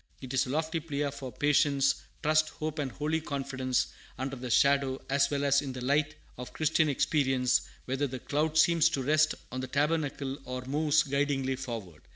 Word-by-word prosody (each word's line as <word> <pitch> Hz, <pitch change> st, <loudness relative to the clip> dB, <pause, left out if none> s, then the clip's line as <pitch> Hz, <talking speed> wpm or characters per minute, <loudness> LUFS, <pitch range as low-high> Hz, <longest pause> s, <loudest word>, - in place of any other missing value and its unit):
It 130 Hz, -1 st, -7 dB
is 130 Hz, 0 st, +2 dB
a -, -, -6 dB
lofty 160 Hz, +3 st, -1 dB
plea 145 Hz, -2 st, -2 dB
for 135 Hz, -2 st, -7 dB
patience, 140 Hz, -1 st, +2 dB, 0.2 s
trust, 155 Hz, +1 st, +3 dB
hope, 155 Hz, 0 st, -5 dB
and 140 Hz, -3 st, -2 dB
holy 155 Hz, +4 st, -1 dB
confidence, 130 Hz, -3 st, -1 dB, 0.3 s
under 135 Hz, +1 st, -3 dB
the 125 Hz, -1 st, -6 dB
shadow, 140 Hz, +1 st, +3 dB
as 140 Hz, +1 st, +3 dB
well 145 Hz, -1 st, -1 dB
as 140 Hz, 0 st, +4 dB
in 135 Hz, -2 st, -5 dB
the 125 Hz, -1 st, -6 dB
light, 145 Hz, +3 st, +1 dB, 0.2 s
of 125 Hz, -, -7 dB
Christian 155 Hz, 0 st, +2 dB
experience, 130 Hz, -3 st, +2 dB, 0.2 s
whether 135 Hz, +3 st, -1 dB
the 130 Hz, 0 st, -5 dB
cloud 150 Hz, +4 st, -1 dB
seems 165 Hz, 0 st, +5 dB
to 135 Hz, -, -2 dB
rest 155 Hz, +3 st, +3 dB, 0.2 s
on 130 Hz, -, -4 dB
the 130 Hz, -, -4 dB
tabernacle, 145 Hz, -1 st, -1 dB
or 125 Hz, 0 st, -5 dB
moves 150 Hz, +2 st, +2 dB
guidingly 140 Hz, -1 st, 0 dB
forward. 115 Hz, -11 st, -7 dB
140 Hz, 185 wpm, -29 LUFS, 130-150 Hz, 0.3 s, seems